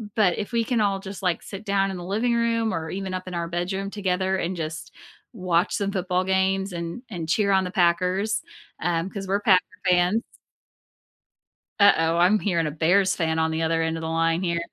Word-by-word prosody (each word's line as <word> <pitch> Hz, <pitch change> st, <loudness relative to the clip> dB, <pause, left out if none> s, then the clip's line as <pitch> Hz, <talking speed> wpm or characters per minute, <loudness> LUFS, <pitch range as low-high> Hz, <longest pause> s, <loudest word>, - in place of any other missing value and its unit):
but 200 Hz, -5 st, +3 dB
if 205 Hz, -, -4 dB
we 230 Hz, -, +2 dB
can 235 Hz, -1 st, +1 dB
all 200 Hz, -2 st, +1 dB
just, 195 Hz, -1 st, -8 dB
like, 180 Hz, -3 st, 0 dB
sit 195 Hz, 0 st, -8 dB
down 195 Hz, -1 st, +1 dB
in 190 Hz, -, -5 dB
the 175 Hz, -, -7 dB
living 220 Hz, +6 st, 0 dB
room 230 Hz, -1 st, +1 dB
or 160 Hz, -1 st, -3 dB
even 190 Hz, 0 st, -4 dB
up 185 Hz, 0 st, -5 dB
in 185 Hz, -, -6 dB
our 170 Hz, 0 st, -2 dB
bedroom 185 Hz, +3 st, -3 dB
together 190 Hz, -1 st, 0 dB
and 185 Hz, 0 st, -2 dB
just 160 Hz, 0 st, -5 dB, 0.4 s
watch 180 Hz, -3 st, 0 dB
some 200 Hz, -1 st, -1 dB
football 185 Hz, -1 st, 0 dB
games 190 Hz, 0 st, +1 dB
and 170 Hz, +8 st, -5 dB
and 170 Hz, -6 st, -5 dB
cheer 200 Hz, +3 st, +2 dB
on 190 Hz, -, +3 dB
the 180 Hz, -, -5 dB
Packers, 185 Hz, +3 st, +1 dB, 0.4 s
um, 170 Hz, +1 st, 0 dB
'cause 195 Hz, -1 st, -6 dB
we're 200 Hz, +1 st, +2 dB
Packer 190 Hz, -3 st, +5 dB, 0.3 s
fans. 180 Hz, +5 st, +3 dB, 1.6 s
Uh-oh, 165 Hz, -4 st, +5 dB
I'm 185 Hz, +5 st, +4 dB
hearing 170 Hz, -6 st, 0 dB
a -, -, -3 dB
Bears 180 Hz, +5 st, +2 dB
fan 160 Hz, -2 st, 0 dB
on 160 Hz, 0 st, +1 dB
the 160 Hz, 0 st, -2 dB
other 165 Hz, 0 st, +1 dB
end 160 Hz, 0 st, -1 dB
of -, -, -6 dB
the 160 Hz, -, -3 dB
line 165 Hz, +2 st, +1 dB
here. 170 Hz, -1 st, 0 dB
185 Hz, 210 wpm, -24 LUFS, 170-200 Hz, 1.6 s, Packer